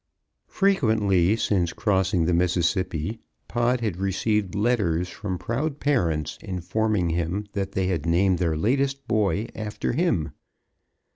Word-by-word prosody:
_ - - -35
Frequently 110 - +3
since 95 -6 0
crossing 95 -4 +1
the 90 - +1
Mississippi 90 +2 0 0.3
Pod 120 +1 +1
had 105 -7 -2
received 100 +1 0
letters 100 -6 +1
from 95 -2 -4
proud 135 - -2
parents 85 - 0
informing 95 0 -1
him 85 +5 -1
that 100 -1 -3
they 95 - 0
had 85 -4 -1
named 90 +2 +3
their 85 -3 0
latest 135 - 0
boy 105 0 +1
after 110 -1 -3
him. 120 - 0
95 Hz, 130 wpm, -25 LUFS, 85-110 Hz, 0.3 s, Frequently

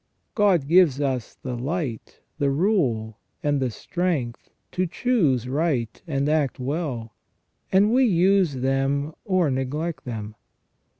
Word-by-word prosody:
God 190 -9 +3
gives 165 -5 +5
us 130 -5 -2
the 125 -2 -3
light, 135 -1 -4 0.2
the 140 -2 +2
rule, 135 - 0 0.2
and 145 -1 +1
the 130 -2 0
strength 150 -2 -3 0.2
to 185 0 0
choose 165 - +1
right 135 -5 -1
and 140 -2 0
act 150 -4 +1
well, 130 -5 -3 0.6
and 200 +4 +4
we 260 +1 +5
use 190 - +3
them 135 +3 0
or 185 -6 +2
neglect 145 +6 -3
them. 110 -4 -5
145 Hz, 125 wpm, -24 LUFS, 130-175 Hz, 0.6 s, gives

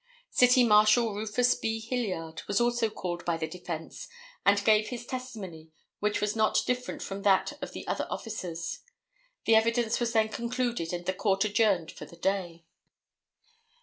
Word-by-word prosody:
City 250 0 +5
Marshal 215 +1 +5
Rufus 220 +4 +1
B. 225 0 -2
Hilliard 210 -9 -3
was 205 - +1
also 240 -1 +2
called 175 -4 -5
by 170 -1 0
the 160 - -2
defence 165 -1 -7 0.4
and 200 0 +3
gave 215 -1 +4
his 240 -1 -6
testimony 210 -12 -7 0.3
which 210 0 0
was 210 +1 -1
not 220 -1 +2
different 250 0 -2
from 195 0 -5
that 195 +7 +3
of - - -6
the - - -7
other - - -2
officers. 175 -7 -5 0.7
The 225 - +4
evidence 230 +1 +3
was 240 -1 0
then 220 -1 +3
concluded 235 -5 -2
and 175 0 -4
the 185 - 0
court 195 +1 +1
adjourned 205 -5 +2
for - - -10
the 170 - -15
day. 175 -3 -2
210 Hz, 160 wpm, -29 LUFS, 180-235 Hz, 0.7 s, City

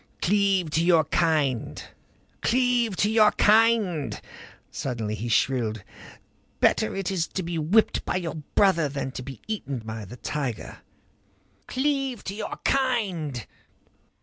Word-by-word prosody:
"Cleave 195 -3 +2
to 160 +2 +2
your 170 -2 +5
kind! 150 -6 0 0.6
Cleave 245 -3 +2
to 205 +3 +1
your 215 -1 +5
kind!" 210 - +3 0.5
Suddenly 115 -5 -3
he 110 +3 -4
shrilled. 115 -4 +1 0.8
"Better - - +2
is 190 -3 -1
it - - -31
to 190 - -1
be 170 -1 -3
whipped 190 +9 +2
by - - -2
your 170 -4 -2 0.2
brother 170 -7 +4
than 140 -1 -4
to 130 - -6
be 135 -2 -9
eaten 200 -11 -3
by 110 -2 -6
the 120 +6 -10
tiger. 135 -4 -4 0.9
Cleave 270 -2 -1
to 195 - -5
your 210 +1 -5
kind. 195 - 0
170 Hz, 130 wpm, -25 LUFS, 135-215 Hz, 0.9 s, your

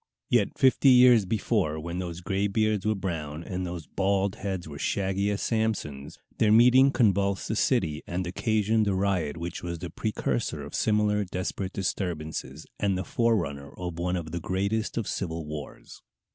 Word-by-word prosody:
Yet - - +2
fifty 135 +1 +5
years 125 -5 +7
before, 95 -7 0
when 85 +3 -5
those 90 -1 -5
gray 95 +3 0
beards 105 0 0
were 110 - +2
brown, 80 -5 -4
and 90 0 -4
those 85 -3 -6
bald 100 +4 0
heads 95 -4 -4
were 70 -2 -8
shaggy 100 +3 0
as 100 -1 -2
Samson's, 105 - -2 0.2
their 105 - +4
meeting 125 +4 +7
convulsed 100 -6 +1
the 110 - -1
city, 90 - +1
and 90 +1 -2
occasioned 110 +3 +1
a 100 - +1
riot 95 -6 0
which 85 +1 -5
was 85 -1 -4
the 85 +1 -7
precursor 80 - -2
of - - -9
similar 105 -1 +2
desperate 95 0 -4
disturbances, 85 -5 -3
and 100 -2 +1
the 95 - -2
forerunner 80 - 0
of 90 -2 -5
one 90 +1 0
of 80 -3 -4
the 85 - -3
greatest 100 +6 -1
of 115 - -1
civil 80 -3 -3
wars. 75 -1 -8
95 Hz, 170 wpm, -27 LUFS, 85-105 Hz, 0.2 s, years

